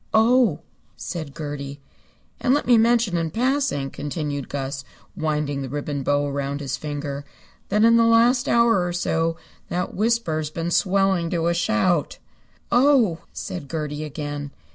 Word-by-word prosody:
"Oh!" 225 - +4 0.4
said 155 -5 -6
Gertie. 145 -2 -5 0.6
"And 255 +2 +3
let 295 - -1
me 245 - +5
mention 230 -4 +3
in 165 -1 -1
passing," 245 - 0
continued 145 -2 -4
Gus, 135 -1 -4 0.3
winding 150 -4 -1
the 135 - -5
ribbon 145 0 -3
bow 145 +2 +1
around 140 0 -3
his 140 -3 -3
finger, 145 -1 -5 0.5
"that 210 +2 +2
in 230 0 +6
the 230 - +5
last 235 +2 +4
hour 235 -5 +4
or 175 0 -2
so 165 -1 0 0.3
that 180 +1 -2
whisper 225 -6 +1
has 155 -1 -2
been 165 +2 -3
swelling 190 -2 +2
to 165 -1 -1
a - - +2
shout." 170 +1 +1 0.5
"Oh!" 245 - +4
said 160 -7 -6
Gertie 150 -2 -3
again. 145 -1 -5
165 Hz, 150 wpm, -23 LUFS, 145-220 Hz, 0.6 s, in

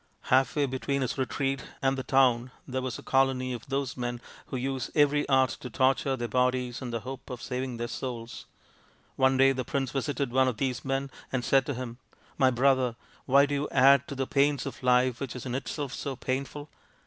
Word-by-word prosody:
Half 130 +1 +4
way 145 -1 +2
between 140 +1 -2
his 125 - -2
retreat 135 0 -1 0.2
and 135 0 +1
the 135 - -3
town 130 -2 +3 0.2
there 130 0 -2
was 130 -2 -3
a - - -11
colony 130 -1 +1
of 120 +1 -7
those 135 -2 -2
men 120 -1 -3 0.3
who 130 - -4
use 130 +1 -2
every 145 -1 +3
art 130 -2 +4
to 125 - -7
torture 135 +2 +2
their 120 -2 -3
bodies 125 0 0
in 130 - -4
the 115 -1 -3
hope 130 +3 -8
of 125 -2 -6
saving 125 0 -4
their 120 0 -3
souls. 120 -2 -6 0.7
One 130 0 +3
day 135 +1 +6
the 130 -1 -2
prince 135 +1 -2
visited 140 -1 -2
one 130 +1 +3
of 125 -4 -1
these 130 -1 -2
men 135 0 -2 0.2
and 125 -2 -1
said 135 +1 +3
to 145 - -2
him, 120 -1 -6 0.2
" - - -31
My 130 -2 +6
brother, 130 -1 +2 0.3
why 140 +1 +6
do 145 - -3
you 145 +1 -1
add 140 +1 +5
to 140 - -6
the 135 0 -1
pains 140 +1 +2
of 135 - -6
life 125 -1 +3
which 135 -3 -5
is 125 - -7
in 125 - -3
itself 135 +1 -4
so 140 -2 -4
painful 135 +3 -4
130 Hz, 215 wpm, -28 LUFS, 125-135 Hz, 0.7 s, day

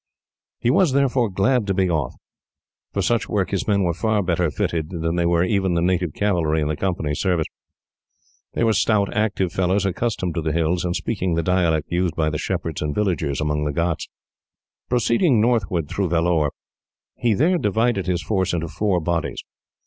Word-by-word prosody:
He 120 - +2
was, 160 -1 +3
therefore, 130 -4 +2
glad 105 +4 +1
to 95 - 0
be 95 -1 +2
off. 75 -8 -1 0.8
For 100 - -1
such 115 +3 0
work, 100 -3 0
his 100 - -2
men 100 -2 +2
were 85 -2 +1
far 105 +4 0
better 85 -1 +1
fitted 80 +1 -2
than 80 -1 -2
were 85 0 +3
even 95 -1 +1
the 85 - +1
native 90 -3 0
cavalry 85 -6 +1
in 75 - 0
the 75 - -1
Company's 80 -4 -2
service. 90 -5 +1 1.1
They - - 0
were 115 -1 +3
stout, 105 -1 +1
active 95 -4 0
fellows, 95 +2 +1
accustomed 95 -2 -1
to 85 - -2
the 80 -1 -1
hills, 85 +1 0
and 90 -1 -1
speaking 95 -6 -1
the 85 - 0
dialect 85 -4 +1
used 90 -1 0
by 80 -1 0
the 75 - -3
shepherds - - -3
and 75 -1 -2
villagers 80 -9 0
among 75 -1 0
the 75 - -1
ghauts. 85 +2 -2 0.8
Proceeding 120 - +3
northward 105 -8 +1
through 95 +3 -1
Vellore, 85 -2 +2 0.7
he 115 -3 +1
there 170 - +2
divided 110 - +1
his 90 -2 0
force 95 -5 0
into 85 -1 -2
four 100 -1 0
bodies. 85 0 -2
90 Hz, 180 wpm, -22 LUFS, 85-105 Hz, 1.1 s, was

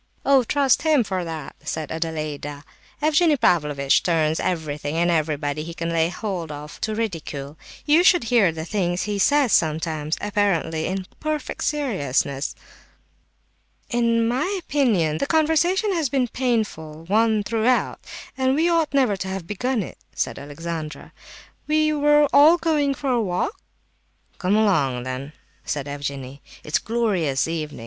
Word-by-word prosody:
"Oh, 275 -2 +5
trust 275 +1 +2
him 305 -5 +3
for 190 -3 -3
that!" 160 -4 -6
said 155 -1 -4
Adelaida. 155 -3 -4 0.4
"Evgenie 310 0 +4
Pavlovitch 150 - +2
turns 160 -2 +1
everything 155 -4 -2
and 170 +1 +2
everybody 150 -2 -1
he 165 +2 -7
can 165 0 -3
lay 165 0 +2
hold 180 -5 -4
of 150 +1 -9
to 215 0 -1
ridicule. 155 -9 -4 0.3
You 310 +4 +5
should 360 -4 +5
hear 230 -6 +3
the 160 0 -6
things 180 -2 -1
he 205 -1 -2
says 285 +3 +3
sometimes, 155 -1 0
apparently 195 -6 0
in 190 +1 -3
perfect 310 -1 -3
seriousness." 145 - -1 1.4
"In 230 -1 +2
my 305 - -1
opinion 215 - +1
the - - -1
conversation 340 +6 +2
has 320 -6 0
been 265 0 +1
a - - -7
painful 210 -12 -2
one 215 +2 +2
throughout, 230 +4 +1 0.4
and 260 0 +1
we 320 +3 +2
ought 330 -4 +1
never 255 -7 +3
to 190 - -4
have 190 -2 -4
begun 225 +4 -1
it," - - -10 0.2
said - - -2
Alexandra. 155 +2 -6 0.5
"We 310 0 +2
were 295 0 +4
all 310 +4 +7
going 300 -4 +1
for 275 -1 -2
a 240 -2 +2
walk—" 185 - -2 0.8
"Come 190 +2 +1
along 145 - +2
then," 130 +3 -5 0.3
said 145 -1 -3
Evgenie; 140 -1 -6 0.2
"it's 150 - 0
a - - -18
glorious 195 - 0
evening. 155 -4 -4
190 Hz, 150 wpm, -23 LUFS, -, 1.4 s, all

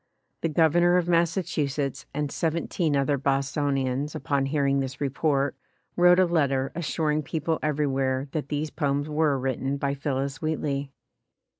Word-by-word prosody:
The 165 - 0
Gov 160 0 +3
ernor 175 +2 +4
of 175 -1 0
Massachusetts 155 -6 0
and 145 0 -2
seventeen 165 -1 -1
other 140 0 +1
Bos 140 +1 0
tonians, 140 0 -1
upon 140 -3 0
hearing 140 -1 +1
this 130 -1 -4
report, 140 0 0 0.4
wrote 175 0 +6
a 185 - +5
letter 140 -6 +1
assuring 155 -2 -1
people 160 +2 -2
everywhere 135 -3 0
that 150 -2 -3
these 150 +1 -2
poems 145 -1 -1
were 150 -2 +1
written 135 +1 -2
by 140 0 -1
Phillis 140 -1 -3
Wheatley. 145 -3 -2
145 Hz, 145 wpm, -26 LUFS, 135-160 Hz, 0.4 s, wrote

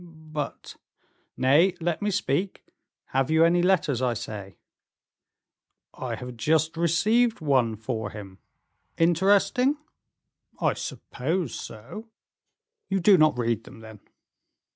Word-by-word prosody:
"But 150 -2 -5 0.3
" - - -43
"Nay, 155 +9 +4
let 170 +1 -2
me 205 - 0
speak. 190 -1 -2 0.4
Have 135 0 0
you 160 +1 +5
any 175 +1 +3
letters, 165 -8 +2
I 125 -2 +1
say?" 105 -4 -7 1.4
"I - - -4
have 125 -1 -8
just 160 +5 +1
received 215 +8 +2
one 130 -8 +1
for 110 -1 -4
him." 100 -3 -10 0.6
"Interesting?" 200 - +3 0.8
"I - - +2
suppose 160 +2 -3
so." 120 - -8 0.8
"You 195 0 +1
do 195 +2 +6
not 155 -6 +4
read 115 -3 -1
them, 115 - -13
then?" 110 -1 -12
155 Hz, 120 wpm, -26 LUFS, 120-185 Hz, 1.4 s, do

